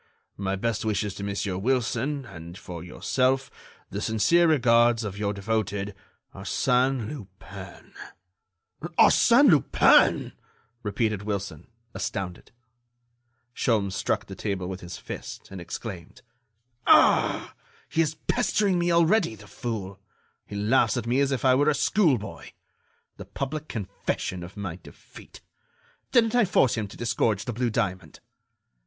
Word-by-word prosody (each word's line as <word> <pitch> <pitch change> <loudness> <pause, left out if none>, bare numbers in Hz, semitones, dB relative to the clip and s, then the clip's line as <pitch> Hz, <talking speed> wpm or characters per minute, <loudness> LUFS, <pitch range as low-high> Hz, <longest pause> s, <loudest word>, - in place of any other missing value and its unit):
"My 95 0 -1
best 110 +1 -2
wishes 105 -2 -1
to 100 - -7
Monsieur 100 -2 -2
Wilson, 130 +4 -1
and, 85 -4 -10
for 85 -5 -8
yourself, 130 +8 0 0.4
the 100 - -4
sincere 110 - +3
regards 120 -5 +4
of 100 -2 -5
your 100 -1 0
devoted 105 -1 -2 0.4
ARSÈNE 125 -2 0
LUPIN." 100 -9 -10 1.0
"Arsène - - +6
Lupin!" - - +4 0.5
repeated 105 -1 -1
Wilson, 100 -6 -4 0.3
astounded. 90 -2 -5 1.0
Sholmes 105 -7 0
struck - - -1
the 95 - -9
table 95 -1 -3
with 95 0 -6
his 85 0 -8
fist, - - -8
and 95 -2 -7
exclaimed: 85 -1 -8 0.6
"Ah! - - +4 0.3
he 165 - +1
is 155 -1 0
pestering 210 -6 +1
me 175 0 +1
already, 170 - +3
the 105 0 -14
fool! 100 -3 -5 0.5
He 100 - -8
laughs 110 +6 +2
at 120 - -3
me 120 +3 +1
as 140 0 +2
if 135 -1 -1
I 130 - +6
were 145 +3 +3
a 150 - +2
schoolboy! 140 - 0 0.6
The - - -9
public 155 +3 -5
confession 95 -3 -4
of 90 +4 -10
my 95 -4 -5
defeat! - - -15 0.7
Didn't 230 -2 +4
I 245 -3 +4
force 135 - +3
him 110 -3 -2
to 100 - -13
disgorge 115 -3 0
the 120 - -3
blue 120 +2 0
diamond?" 95 -4 -3
110 Hz, 135 wpm, -26 LUFS, 100-130 Hz, 1.0 s, Arsène